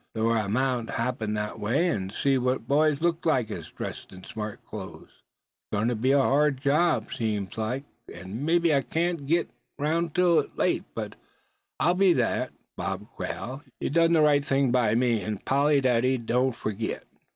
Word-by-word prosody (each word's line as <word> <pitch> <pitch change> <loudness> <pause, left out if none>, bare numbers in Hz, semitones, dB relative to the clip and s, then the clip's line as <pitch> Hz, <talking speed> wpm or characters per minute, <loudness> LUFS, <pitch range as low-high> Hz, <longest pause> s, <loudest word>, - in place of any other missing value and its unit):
Thort 115 +1 +2
I 110 -3 0
mout 125 +1 0
happen 115 -3 -2
thet 105 0 -3
way, 135 +12 +1
an' 95 - -1
see 135 +6 +1
what 125 -2 -1
boys 150 +2 +2
looked 170 -1 +1
like 125 -8 +1
as - - -3
was - - -10
dressed - - -7
in 95 0 -12
smart 105 -1 -7
close. - - -8
It's - - -30 0.5
gwine 105 +3 +1
to 120 - 0
be 125 +5 +1
a 140 - +5
hard 140 0 +3
job, 140 -4 +1
seems 105 -4 -2
like, 110 +5 -2 0.3
an' 95 +8 -7
mebbe 170 +2 +2
I 150 -4 +4
carn't 165 -1 -2
git 170 +3 +1 0.3
'roun' 165 +3 0
till 175 +1 +3
late, - - +1
but - - -4 0.7
I'll 175 - +3
be 185 -1 +4
thar, - - 0 0.3
Bob - - -4
Quail! 130 +3 -5 0.2
Ye - - -2
done 165 +3 +3
ther 160 -2 +5
right 145 -1 +4
thing 135 -2 +1
by 120 -4 +2
me, 120 -3 +2
an' 110 -1 -3
Polly 140 +5 +2
Dady 130 +1 +3
don't 125 +1 +1
forgit." 110 0 -4
130 Hz, 185 wpm, -27 LUFS, 110-150 Hz, 0.7 s, a